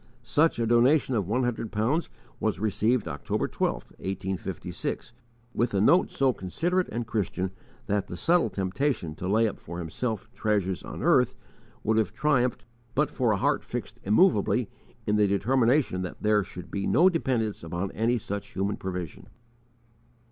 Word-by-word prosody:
Such 160 +2 +2
a 115 - +1
donation 125 +4 +4
of 105 -7 0
one 120 +5 +1
hundred 115 -2 -2
pounds 120 +11 0 0.3
was - - 0
received 110 +2 +1
October 70 -4 -2
12, - - 0 0.3
1856, 95 +1 -4 0.4
with 120 -3 0
a - - +3
note 170 - +5
so 135 -2 +2
considerate 175 - -1
and 120 0 -3
Christian 95 -4 -2 0.3
that 100 -1 0
the 90 - -6
subtle 170 - +3
temptation 95 - -1
to 90 +4 -5
lay 110 +4 +3
up 105 - -5
for 85 +2 -8
himself 110 +7 -3
treasures 100 -4 0
on - - -7
earth - - +4 0.5
would 110 +1 +2
have 110 -5 +1
triumphed 125 -4 +1 0.3
but 150 +1 +2
for 125 -6 +1
a 105 - +2
heart - - +1
fixed - - -6
immovably - - +3 0.3
in 105 0 +2
the 105 -1 +4
determination 120 +1 +2
that 90 - -6
there 105 -1 +3
should 90 -1 -9
be 100 -1 -2
no 175 - +5
dependence 125 - 0
upon 85 +4 -3
any 115 +3 +1
such 100 -2 -5
human 100 +2 -1
provision. 90 -4 -5
110 Hz, 160 wpm, -27 LUFS, 95-125 Hz, 0.5 s, note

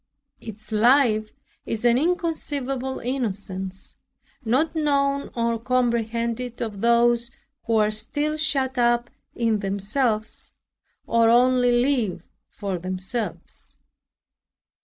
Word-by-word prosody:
Its 215 0 -8
life 220 -1 +4 0.3
is 225 +1 -3
an 235 -1 +5
inconceivable 280 -5 -1
innocence, 195 -7 -4 0.5
not 265 +9 +1
known 280 -2 +1
or 230 -1 0
comprehended 235 0 -1
of 210 -4 -4
those 235 0 +3 0.4
who 230 - +1
are 215 -1 +3
still 290 +8 -2
shut 270 -4 0
up 240 0 +2 0.2
in 225 -3 +1
themselves 215 +3 -1 0.5
or 230 -1 +3
only 250 +1 +4
live 240 - +1 0.3
for 195 -4 -4
themselves. 185 +6 -5
235 Hz, 95 wpm, -24 LUFS, 215-260 Hz, 0.5 s, an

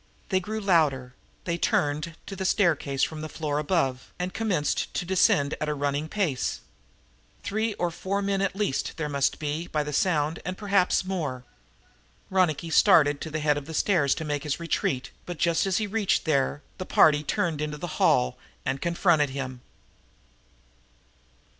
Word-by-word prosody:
They 185 - +2
grew 215 +4 -4
louder, 150 -10 +2 0.3
they 170 -1 -2
turned 155 +2 0
to 195 - -7
the 190 - -4
staircase 160 -8 +1
from 155 -1 -1
the 155 - -5
floor 150 -2 -2
above 145 -5 -1
and 180 +1 -3
commenced 200 -10 0
to - - -1
descend 155 -5 +3
at 155 - -1
a 150 - -1
running 145 +2 -1
pace. 165 - -1 0.8
Three 215 +1 -1
or 175 -1 -1
four 200 +4 -2
men 195 -1 0
at 195 -1 0
least, 200 -9 -1
there 155 -2 -2
must 140 -2 0
be, 155 +3 -3
by 150 -1 -1
the 150 0 -5
sound, 155 -3 +1
and 185 +2 -4
perhaps 195 -3 +2
more! 150 -10 -3 0.9
Ronicky 170 -3 +1
started 150 -7 +5
for 160 - -4
the 155 0 -3
head 150 -1 +2
of 140 - -13
the 160 - -6
stairs 155 -9 +2
to 160 - -5
make 145 -1 -2
his 150 +1 -2
retreat, 150 -5 -1 0.2
but, 175 -2 -5
just 170 +3 +2
as 190 - +1
he 215 - 0
reached 205 -1 0
there, 145 -1 +1 0.2
the 185 - -4
party 150 -1 +5
turned 155 0 -1
into 150 0 -3
the 165 +2 -6
hall 60 0 +3 0.3
and 135 +1 -2
confronted 170 -4 +2
him. 130 -2 -5
160 Hz, 170 wpm, -26 LUFS, 145-185 Hz, 0.9 s, started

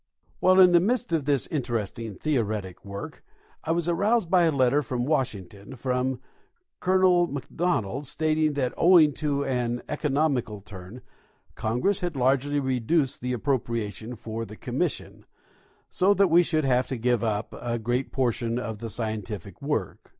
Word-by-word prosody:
While 185 +1 +5
in 180 -1 +8
the 175 - +6
midst 235 +1 0
of 155 -4 +1
this 140 -3 +2
interesting 115 -6 -3
theoretic 110 - -2
work 100 0 -8 0.4
I - - -7
was 170 0 0
aroused 200 +2 +1
by 180 -2 +5
a 165 - +3
letter 135 0 +3
from 125 -2 -3
Washington, 120 - -3
from 125 +1 -1 0.6
Colonel 185 -1 +3
McDonald, 140 - -2
stating 155 +1 +1
that 130 -3 -1
owing 165 -4 +6
to 140 -2 0
an 120 -2 -1
economical 140 -7 0
turn, 100 +4 -11 0.5
Congress 125 - 0
had 175 -4 -3
largely 135 +2 +1
reduced 130 +2 0
the 125 +1 -2
appropriation 115 -3 -2
for 115 0 -5
the 110 -1 -10
Commission, - - -3 0.6
so 195 +2 +2
that 195 -2 +4
we 170 +1 +7
should 155 -3 0
have 125 -1 +2
to 130 - -3
give 120 0 +1
up 105 -1 -2
a 120 -1 -2
great 120 +3 -2
portion 120 -2 -1
of 110 -4 -4
the 115 0 -5
scientific 105 -3 -5
Avork. 140 - -2
130 Hz, 150 wpm, -26 LUFS, 115-155 Hz, 0.6 s, in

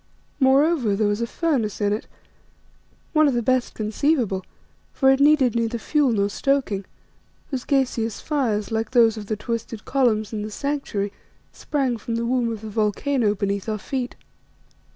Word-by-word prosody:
Moreover, 270 -4 +3
there 210 +1 +1
was 205 +2 0
a 235 - 0
furnace 260 - -1
in 205 -1 +1
it, 210 - -4 1.1
one 310 -1 +5
of 270 - +1
the 240 - 0
best 255 +1 +1
conceivable, 220 -2 0 0.5
for 265 -1 +4
it 270 - +3
needed 280 -4 +5
neither 230 0 0
fuel 290 +3 +1
nor 200 -3 +2
stoking, 215 -3 0 0.7
whose 260 -3 -3
gaseous 245 -5 0
fires, 230 -9 -1
like 225 0 -1
those 230 -3 +4
of 210 -2 -7
the 215 - -1
twisted 225 0 -5
columns 225 -6 +1
in 215 - -2
the 210 - -4
Sanctuary, 215 -6 -3 0.4
sprang 270 -5 -1
from 230 +1 -4
the 230 0 -1
womb 240 -1 +1
of 220 -2 -5
the 220 - -7
volcano 215 +2 +1
beneath 200 +1 -2
our 215 - -1
feet. 250 +3 -4
230 Hz, 165 wpm, -23 LUFS, 210-270 Hz, 1.1 s, one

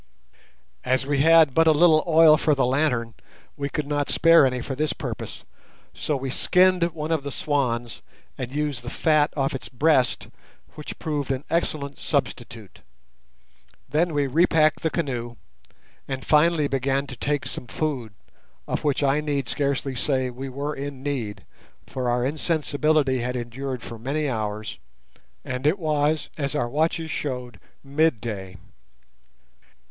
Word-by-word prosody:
As 130 +1 +1
we 140 0 0
had 160 -1 +6
but 165 +3 +4
a - - +8
little 155 0 +5
oil 160 -1 +7
for 150 0 +2
the 135 - +2
lantern, 125 -4 0 0.4
we 140 0 -3
could 150 - -3
not 145 0 -1
spare 165 -3 +6
any 125 -1 -2
for 135 - -4
this 150 +3 -1
purpose, - - -6 0.5
so 150 - -2
we 135 0 -4
skinned 185 +5 +3
one 155 +1 -3
of 160 -3 +1
the 140 - -5
swans, 125 - -1 0.3
and 125 -1 -5
used 145 -3 -2
the 120 - -6
fat 155 +1 +2
off 135 -1 0
its 135 - -6
breast, 135 -1 +2 0.5
which 150 - -8
proved 145 -4 -3
an 135 0 -2
excellent 150 -4 -1
substitute. 120 - -3 1.1
Then 160 +5 +1
we 145 -1 +2
repacked 155 +2 +3
the 160 - +1
canoe, 125 -8 -3 0.7
and 135 -1 -5
finally 155 0 +4
began 135 0 0
to 130 - -8
take 145 +3 -1
some 125 - -6
food, 130 -4 -3 0.6
of - - -2
which 145 -1 +1
I 140 +2 +2
need 145 -4 -2
scarcely 140 0 -1
say 130 0 -1
we 135 +2 -6
were 140 +3 -3
in 140 -2 -6
need, 110 -9 -4 0.4
for 125 -2 -3
our 120 0 +1
insensibility 150 -2 +1
had 125 +1 -2
endured 125 +1 -5
for 115 0 -8
many 145 +6 -1
hours, 110 -3 -4 0.7
and 130 +2 -2
it 165 +6 +3
was, 155 -2 0
as 140 0 -2
our 145 -5 0
watches 160 +4 -1
showed, 125 -8 -4 0.2
midday. 120 - -1
140 Hz, 150 wpm, -24 LUFS, 125-155 Hz, 1.1 s, a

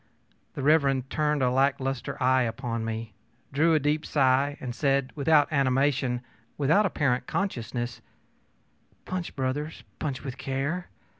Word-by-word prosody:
ö - - -38 0.5
The 135 - -4
Rev. 155 +3 +6
Mr. 135 -2 0
turned 150 -2 +1
a 125 - +3
lack 135 +2 +2
lustre 135 -1 -3
eye 130 0 +4
upon 115 -1 -2
me, 110 -1 -4 0.4
drew 160 +3 +4
a - - +4
deep 150 +2 0
sigh, 140 0 +2
and 125 -2 -5
said, 135 +1 +1
without 150 0 +4
animation, 135 -2 +2 0.4
without 160 +9 +3
apparent 140 -8 0
consciousness: 120 - -3 1.0
ōPunch, 185 -2 -4
brothers, 145 +4 -3 0.2
punch 140 -4 -3
with 135 -2 -6
care! 140 +7 -2
135 Hz, 145 wpm, -27 LUFS, 130-150 Hz, 1.0 s, Rev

